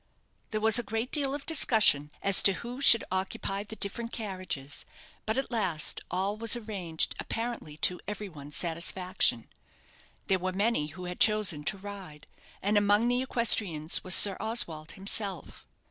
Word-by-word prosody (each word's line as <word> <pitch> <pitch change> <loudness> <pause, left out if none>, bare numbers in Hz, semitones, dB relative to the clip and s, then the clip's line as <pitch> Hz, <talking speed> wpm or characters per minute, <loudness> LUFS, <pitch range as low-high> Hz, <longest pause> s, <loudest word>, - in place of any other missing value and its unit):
There 215 - -3
was 220 +2 +5
a 235 - -8
great 225 +3 -4
deal 280 -2 +1
of 285 - -9
discussion 215 - +3
as 195 -1 +6
to 195 - +4
who 245 +7 -8
should 230 -5 +7
occupy 195 +1 -3
the 220 - -10
different 230 +3 -4
carriages; 185 - -6 0.4
but 220 - -2
at 270 - -4
last 185 -10 -1
all 190 +3 -2
was 230 0 +4
arranged 195 -8 -2
apparently 225 -10 -6
to 180 - -2
every 210 0 -6
one's 150 -4 -10
satisfaction. 175 - -1 0.8
There 190 -1 0
were 185 +1 -4
many 200 -5 -1
who 175 +4 -10
had 180 0 -8
chosen 210 -9 +4
to 195 +5 -1
ride; 190 -7 -11 0.4
and 205 +1 +2
among 205 +3 +1
the 245 +1 0
equestrians 210 -11 +1
was 185 -1 +5
Sir 195 -2 +8
Oswald 195 -9 -1
himself. 195 -2 -3
200 Hz, 160 wpm, -27 LUFS, 180-225 Hz, 0.8 s, Sir